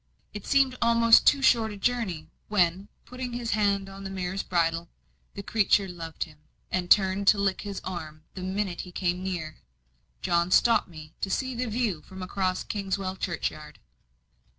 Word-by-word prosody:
It 210 -1 -8
seemed 275 -2 +3
almost 230 -1 +5
too 280 -2 +5
short 225 -4 +4
a 205 - -8
journey, 200 -7 -1 0.2
when, 185 -1 +1 0.2
putting 250 -1 -6
his 240 -1 -3
hand 200 -2 +1
on 195 0 -10
the 195 - -5
mare's 190 0 -3
bridle 165 -1 0 0.5
the 200 - -6
creature 205 -1 +2
loved 165 -3 -5
him, 155 -2 -15 0.3
and 180 -1 -1
turned 195 0 +4
to 210 - +7
lick 200 -1 0
his 200 -2 -5
arm 155 -4 -6
the 185 - -7
minute 190 -1 -2
he 180 - -10
came 180 0 -1
near 175 -4 -4 0.7
John 170 +1 +2
stopped 230 +5 +4
me 155 -2 -12
to 195 - -1
see 260 +6 -1
the 250 +1 -2
view 215 -7 -1
from 190 +2 -9
across 185 0 -1
Kingswell 195 -2 -3
churchyard. 155 -4 -4
195 Hz, 170 wpm, -27 LUFS, 175-215 Hz, 0.7 s, to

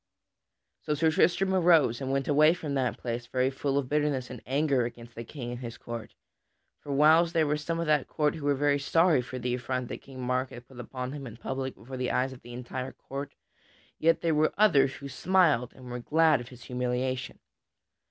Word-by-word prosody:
So 150 - -1
Sir 160 +2 +2
Tristram 190 +4 +2
arose 165 -9 +4
and 135 0 -2
went 135 0 0
away 155 +3 +5
from 155 -5 -5
that 130 -3 0
place 120 0 -4
very 130 +1 +1
full 140 +1 -1
of 140 -2 0
bitterness 145 -3 0
and 125 - -8
anger 135 -1 +2
against 120 0 -7
the 115 - -7
King 120 0 -7
and 120 - -6
his 120 -2 -7
court. 115 -2 -7 0.6
For 145 - -8
whiles 160 +4 +5
there 160 -2 +3
were 150 0 +1
some 165 +2 -3
of 170 - -1
that 150 -3 +2
court 150 -1 0
who 150 - -7
were 145 0 +2
sorry 165 0 +3
for 130 +1 -7
the 125 0 -2
affront 125 0 -3
that - - -6
King 135 -1 -12
Mark 125 +1 -1
had 120 0 -11
put 130 -2 -14
upon 125 +1 -5
him 140 -2 -7
in 115 0 -10
public 130 +2 -4
before 130 +6 -9
the 125 -1 -1
eyes 130 +1 0
of 130 - -13
the 120 - -12
entire 125 +2 -5
court, 140 +1 -7 0.6
yet 165 +1 +3
there 165 -1 +1
were 155 +1 +2
others 140 -10 +4
who 140 - -8
smiled 150 -3 +2
and 130 - -13
were 125 - -4
glad 155 +2 +3
of 120 - -10
his 125 -1 -13
humiliation. 125 +1 -2
135 Hz, 210 wpm, -28 LUFS, 125-150 Hz, 0.6 s, away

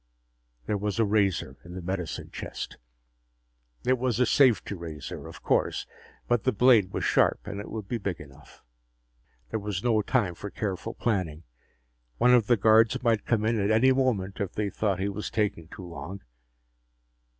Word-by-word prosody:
There 105 - -1
was 105 +1 -2
a 115 - +3
razor 100 -10 +1
in 90 0 -10
the 95 - -5
medicine 90 -2 -4
chest. - - -6 1.1
It 130 0 +2
was 125 -2 0
a 125 - +5
safety 125 -4 +3
razor, 80 -6 -7
of - - -12
course, - - +1 0.4
but 120 -4 +2
the - - +3
blade 110 -4 +4
was - - -3
sharp - - +2
and 100 - -5
it 105 - -7
would 110 -3 -6
be 120 +1 -2
big 100 -3 -3
enough. 70 0 -15 0.9
There 110 - -1
was 100 -2 -4
no 115 -3 +3
time 105 -5 +1
for 100 +4 -7
careful 100 +2 -4
planning. 90 -8 -1 0.7
One 125 - +5
of 120 -4 +4
the 120 - +4
guards 115 +4 +4
might 115 -3 +1
come 110 -2 +1
in 115 0 +1
at 100 0 +1
any 115 +5 +5
moment 120 -8 0
if 95 -2 -3
they 105 -2 -2
thought 100 -1 0
he 95 - 0
was 100 +1 -4
taking 105 -7 -1
too 90 - -10
long. 90 +3 -8
105 Hz, 175 wpm, -27 LUFS, 95-115 Hz, 1.1 s, a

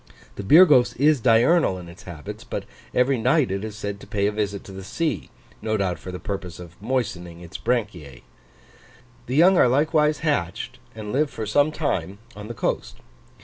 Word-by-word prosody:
The - - -5
Birgos 145 - +6
is 145 +2 +4
diurnal 120 - +4
in 90 -1 -9
its 90 +3 -12
habits; 75 -4 -8
but - - -5 0.3
every 125 0 +2
night 130 - +2
it 100 +1 -2
is 110 -1 -6
said 100 -1 -5
to - - -13
pay 100 -1 -1
a 105 - +2
visit 100 -2 -3
to - - -11
the 95 0 -8
sea, 160 - -2 0.3
no 110 0 -1
doubt 95 -3 -1
for 95 - -8
the 90 - -6
purpose 95 -5 -5
of 85 -2 -10
moistening 100 -8 -3
its 85 -1 -9
branchiae. 95 - -3 1.0
The 125 - -2
young 175 +4 +6
are - - +6
likewise 150 +3 +2
hatched, 150 -2 -2 0.2
and 105 -1 -6
live 145 +2 +2
for 110 - -5
some 145 +8 +2
time, 100 - -2 0.2
on 105 0 -8
the 120 - -7
coast. - - -2
110 Hz, 190 wpm, -23 LUFS, 95-140 Hz, 1.0 s, Birgos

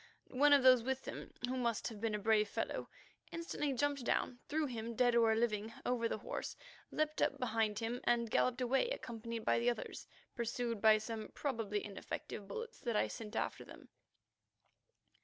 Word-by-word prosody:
One 290 +3 +5
of 285 -2 +7
those 255 -2 +8
with 265 +2 -2
him, - - -6 0.2
who 255 - -1
must 235 -3 0
have 215 -3 -9
been 225 -2 0
a - - 0
brave 210 0 +3
fellow, - - -3 0.4
instantly 335 -4 -2
jumped 285 +1 0
down, 245 +1 0
threw 310 +1 +1
him, 235 -3 -4
dead 245 +1 +4
or 225 -1 +5
living, 220 -1 0
over 235 -2 +1
the - - -1
horse, - - -5 0.3
leaped 310 0 -1
up - - +2
behind 225 -4 0
him, 230 +2 -2
and 235 -2 +2
galloped 255 0 +2
away 265 - +2
accompanied 230 - -5
by - - +3
the 235 +1 +3
others, 240 - -4 0.3
pursued 235 -2 -2
by 220 -1 +7
some 220 0 -5
probably 225 -7 -2
ineffective 200 0 -6
bullets 465 - -6
that 235 -3 -2
I - - +3
sent 220 -3 -7
after - - -2
them. - - -13
235 Hz, 175 wpm, -36 LUFS, 220-255 Hz, 0.4 s, those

